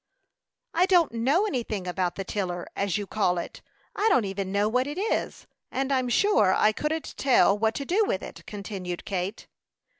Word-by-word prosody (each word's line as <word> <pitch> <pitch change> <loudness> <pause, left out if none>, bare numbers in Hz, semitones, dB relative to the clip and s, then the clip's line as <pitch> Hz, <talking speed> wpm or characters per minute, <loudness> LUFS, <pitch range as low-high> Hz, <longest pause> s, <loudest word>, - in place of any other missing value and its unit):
"I 355 +3 +3
don't 355 -4 +4
know 265 - +2
anything 230 - -3
about 180 -1 -1
the 195 - -4
tiller, 180 -3 -3
as 200 -4 0
you 205 - -3
call 190 -3 0
it. 170 - -6 0.3
I 430 +2 +2
don't 250 - +3
even 195 -1 -3
know 200 +1 +2
what 250 +4 +1
it 295 +3 -5
is, 420 +4 -2 0.2
and 270 +1 -2
I'm 255 -2 +1
sure 225 - +4
I 215 - +4
couldn't 300 +7 -3
tell 250 -6 +4
what 220 +1 0
to 280 - -3
do 390 +9 +2
with 190 - -2
it," 165 - -9
continued 195 -4 -6
Kate. 195 +1 -3
215 Hz, 185 wpm, -26 LUFS, 190-280 Hz, 0.3 s, don't